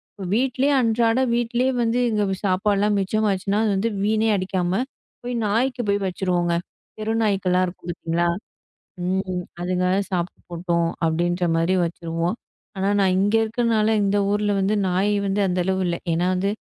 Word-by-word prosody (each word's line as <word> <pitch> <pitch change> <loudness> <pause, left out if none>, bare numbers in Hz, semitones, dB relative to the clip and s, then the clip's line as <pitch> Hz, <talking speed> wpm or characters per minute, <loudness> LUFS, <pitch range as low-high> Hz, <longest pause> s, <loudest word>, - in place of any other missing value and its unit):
இப்ப 195 - -7
வீட்லே 260 +3 +1
அன்றாட 230 0 +2 0.2
வீட்டுலயே 240 +2 +1
வந்து 230 +1 +1
இங்க 210 -2 +1 0.2
சாப்பாட்லாம். 200 +2 +2
மிச்சம் 215 +3 0
ஆச்சுனா, 195 +1 0 0.2
அது 220 +4 0 0.2
வீணா 220 +1 +2
அடிக்காம 185 +1 -1 0.4
போய் 245 +1 -3
நாய்க்கு 245 +5 0
போய் 200 0 +1
வச்சிருவோங்க. 180 -2 0 0.4
தெரு 215 +1 -2
நாய்கள்லாம் 185 -3 +2
இருக்கும் 175 0 -9
பாத்தீங்களா? 170 0 -1 0.8
ம், 185 0 -1 0.2
அதுங்க 180 0 0 0.2
சாப்பிட்டு 180 -1 -3
போட்டோம் 170 -1 0 0.2
அப்பிடின்றமாரி 170 +1 +1
வச்சிருவோம். 170 +3 -3 0.4
ஆனா 190 +1 +1
நான் 190 -2 +3
இங்க 205 +2 +1
இருக்குறனால 225 -1 +1
இந்த 200 +1 +1
ஊர்ல 205 0 +1
வந்து 195 +2 +1
நாய் 190 +3 +1
வந்து 195 +1 0
அந்த 180 0 -1
அளவு 190 +1 0
இல்ல. 170 -1 0 0.2
ஏன்னா 170 +2 +1
வந்து 190 +2 0
195 Hz, 145 wpm, -23 LUFS, 180-215 Hz, 0.8 s, நான்